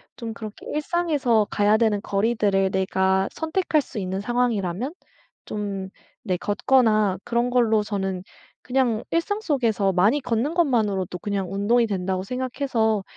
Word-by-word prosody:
좀 230 -2 -6
그렇게 215 -2 -9
일상에서 295 - +1
가야 205 +1 +3
되는 220 -3 +2
거리들을 200 -2 +1
내가 190 0 +1
선택할 320 -1 0
수 235 -5 -7
있는 190 +1 -3
상황이라면 240 - -1 0.5
좀 200 -2 -4 0.4
네 185 -2 +1
걷거나 215 -2 +2
그런 240 +1 0
걸로 225 -4 +3
저는 190 -3 -3 0.4
그냥 250 -4 +1
일상 370 +6 0
속에서 230 - +1
많이 210 +11 +3
걷는 245 +6 -1
것만으로도 210 - +1
그냥 195 -1 -3
'운동이 230 +4 +3
된다.'고 185 -1 -2
생각해서 250 -3 -1
215 Hz, 310 characters per minute, -24 LUFS, 195-250 Hz, 0.5 s, 가야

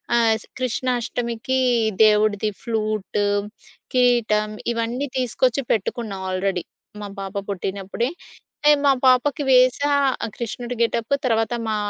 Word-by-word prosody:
ఆహ్, 230 -2 +4
స్ - - -15
కృష్ణాష్టమికి 250 0 -1 0.4
దేవుడిది 210 0 +2
ఫ్లూటు, 215 -3 -1 0.7
కిరీటం, 235 -4 +3 0.2
ఇవన్నీ 235 +4 -2
తీసుకొచ్చి 255 +2 +1
పెట్టుకున్నా 220 0 -2
ఆల్రెడీ 185 -1 -1 0.4
మా 205 - -5
పాప 195 +1 -7
పుట్టినప్పుడే. 195 +4 -3 0.5
అంటే 295 - +6
మా 280 - +6
పాపకి 260 +4 +3
వేశా 255 +2 +4 0.4
ఆ - - -3
కృష్ణుడి 240 +1 -5
గెటప్. 230 +2 0
తర్వాత 225 -1 +1 0.2
మా 215 - 0
230 Hz, 110 wpm, -22 LUFS, 210-250 Hz, 0.7 s, అంటే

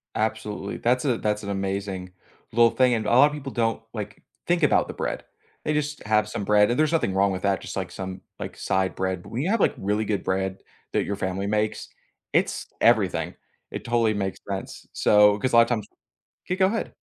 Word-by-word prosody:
Absolutely, 110 -2 -2
that's 125 +2 +1
a 130 -5 +2
that's 105 0 -1
an 100 - -7
amazing 95 -1 -3 0.4
little 115 0 +5
thing, 130 -1 +3
and 110 -2 -2
a - - 0
lotta 140 +5 +6
people 140 -3 -6
don't, 115 -2 0
like, 105 -1 -6 0.2
think 175 -1 +1
about 150 - +4
the - - -6
bread, - - -3 0.4
they 155 - 0
just 150 0 -2
have 105 -1 +2
some 105 -1 -4
bread 105 +1 +4
and 120 - 0
there's 155 0 +3
nothing 155 - +1
wrong 100 0 +3
with 95 0 -4
that, 100 -1 +1
just - - -7
like 95 -1 -3
some, 95 0 -6 0.2
like, - - -6
side 95 0 0
bread 95 -1 -2
but - - -13
when 120 - -2
you 170 - -1
have, 225 0 +2
like, - - +3
really 105 +2 0
good 105 -2 -1
bread 95 0 -1 0.3
that - - +1
your 100 - -2
family 95 +1 -2
makes, 105 +1 -1 0.5
it's - - +1 0.2
everything. - - +3 0.4
It - - -6
totally 115 -2 +2
makes 95 -2 -2
sense, 95 -1 -5
so 105 0 +5
'cause 130 +4 -1
a - - +7
lotta 115 +1 +6
times 110 -4 -1 0.6
kay, 180 - -1
go 190 0 +3
ahead. 225 +4 -2
105 Hz, 215 wpm, -25 LUFS, 95-120 Hz, 0.6 s, a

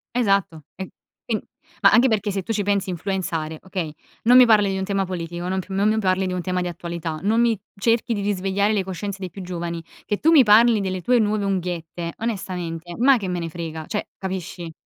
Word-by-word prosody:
Esatto. 195 -9 +1
E 190 0 -6 0.4
in - - 0 0.4
ma - - +7
anche 245 +2 +6
perché 210 -3 0
se 195 -1 -3
tu 225 - -2
ci 205 - 0
pensi, 200 -1 0
influenzare, 170 -4 -3
okay, 180 -5 -4 0.3
non 245 +2 +7
mi 255 - +9
parli 210 -3 +4
di 190 - -1
un 190 - -2
tema 195 0 0
politico, 175 -1 -5
non 190 0 0
p - - -6
non 195 +2 +2
mi 220 0 +1
parli 190 -1 +1
di 185 - -2
un 180 - -2
tema 180 +1 -1
di 180 - -2
attualità, 170 -2 -5
non 220 +3 +2
mi 230 -4 +2 0.2
cerchi 230 +3 +1
di 205 - -2
risvegliare 200 +1 0
le 205 -3 +1
coscienze 195 +1 -5
dei 185 -2 -5
più 195 - -9
giovani. 170 -2 -5 0.2
Che 205 - -1
tu 325 +8 +3
mi 290 -5 +8
parli 225 +1 +6
delle 185 -2 -2
tue 245 +6 +3
nuove 210 -1 +1
unghiette, 175 -3 -3
onestamente, 180 -6 -4
ma 260 +2 +5
che 200 -5 -4
me 180 -1 -2
ne 165 -1 -4
frega? 160 -1 -6
Cioè, 210 - -3
capisci? 185 -3 -5
190 Hz, 220 wpm, -23 LUFS, 175-210 Hz, 0.4 s, mi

